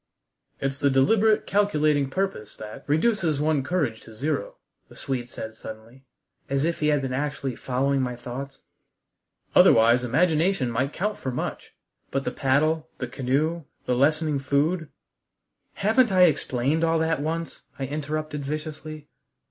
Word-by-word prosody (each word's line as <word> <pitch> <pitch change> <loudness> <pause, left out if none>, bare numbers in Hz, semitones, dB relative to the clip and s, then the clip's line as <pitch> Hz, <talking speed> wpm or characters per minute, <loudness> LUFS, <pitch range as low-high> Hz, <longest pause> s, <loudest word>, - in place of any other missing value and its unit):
"It's 135 0 -2
the 140 - +3
deliberate, 210 +11 +3
calculating 155 -9 +2
purpose 190 - -3
that 105 0 -9
reduces 160 -1 +2
one's 150 -3 +1
courage 145 -12 -1
to 110 - -13
zero," 155 - -2 0.3
the - - -15
Swede 125 -3 -4
said 110 -2 -7
suddenly, 110 +4 -11 0.4
as 140 0 +1
if 170 +1 0
he 150 - +1
had 145 -2 +2
been 130 -1 -2
actually 140 -2 -2
following 135 +3 0
my 125 -1 -2
thoughts. 130 +3 -7 0.9
"Otherwise 115 +2 +6
imagination 160 +2 +2
might 130 +4 0
count 210 +5 -2
for 130 - -3
much. 125 - -5 0.3
But 135 0 -1
the - - -2
paddle, 155 +4 +1
the 125 - -3
canoe, 140 +6 -1 0.2
the 125 - +1
lessening 150 +3 +2
food 150 +4 0 0.4
" - - -52
"Haven't 225 +2 +4
I 185 -1 +6
explained 145 -1 +2
all 165 0 +3
that 160 -2 0
once?" 165 +2 -3 0.2
I 135 - -2
interrupted 150 +1 -3
viciously. 155 +1 -6
145 Hz, 150 wpm, -25 LUFS, 130-160 Hz, 0.9 s, Otherwise